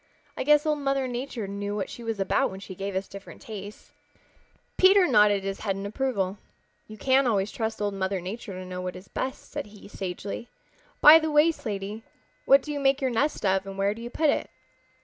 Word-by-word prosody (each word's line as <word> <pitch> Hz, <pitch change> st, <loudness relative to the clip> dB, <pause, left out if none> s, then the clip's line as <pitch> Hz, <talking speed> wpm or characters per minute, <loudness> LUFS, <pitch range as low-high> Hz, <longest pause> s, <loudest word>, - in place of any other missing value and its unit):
I -, -, -2 dB
guess 295 Hz, +2 st, +4 dB
Old 305 Hz, -1 st, +1 dB
Mother 275 Hz, -1 st, 0 dB
Nature 245 Hz, -3 st, -4 dB
knew 200 Hz, +1 st, -4 dB
what 200 Hz, -2 st, -2 dB
she 240 Hz, -, -9 dB
was 225 Hz, -2 st, -3 dB
about 195 Hz, -, +1 dB
when 190 Hz, -, -8 dB
she 195 Hz, -1 st, -9 dB
gave 195 Hz, +1 st, -5 dB
us 190 Hz, +1 st, -2 dB
different 200 Hz, 0 st, -11 dB
tastes." 205 Hz, -1 st, -9 dB, 0.8 s
Peter 380 Hz, 0 st, +6 dB
nodded 210 Hz, -, +4 dB
his 195 Hz, 0 st, -4 dB
head 195 Hz, -3 st, -1 dB
in 195 Hz, +1 st, -5 dB
approval. 205 Hz, -4 st, -2 dB, 0.5 s
"You 215 Hz, -, -10 dB
can 265 Hz, +4 st, +3 dB
always 200 Hz, -3 st, +1 dB
trust 220 Hz, -1 st, -3 dB
Old 205 Hz, -1 st, -1 dB
Mother 190 Hz, 0 st, -1 dB
Nature 195 Hz, +4 st, -6 dB
to 185 Hz, 0 st, -7 dB
know 180 Hz, 0 st, -6 dB
what 180 Hz, 0 st, -4 dB
is 185 Hz, +1 st, -11 dB
best," 265 Hz, -, -5 dB
said 290 Hz, -6 st, -5 dB
he 205 Hz, -1 st, -14 dB
sagely. 200 Hz, +4 st, -6 dB, 0.5 s
"By 310 Hz, +2 st, +10 dB
the 315 Hz, 0 st, -2 dB
way, 300 Hz, +2 st, +5 dB
Slaty, 210 Hz, -5 st, -5 dB, 0.4 s
what 275 Hz, 0 st, +6 dB
do 300 Hz, -, -5 dB
you 290 Hz, -, -3 dB
make 270 Hz, 0 st, +3 dB
your 265 Hz, -3 st, 0 dB
nest 275 Hz, +1 st, 0 dB
of 190 Hz, 0 st, +1 dB
and 195 Hz, 0 st, -7 dB
where 200 Hz, +1 st, +1 dB
do 230 Hz, -, -11 dB
you 240 Hz, -, -6 dB
put 305 Hz, +3 st, +2 dB
it?" -, -, -2 dB
210 Hz, 215 wpm, -26 LUFS, 195-270 Hz, 0.8 s, By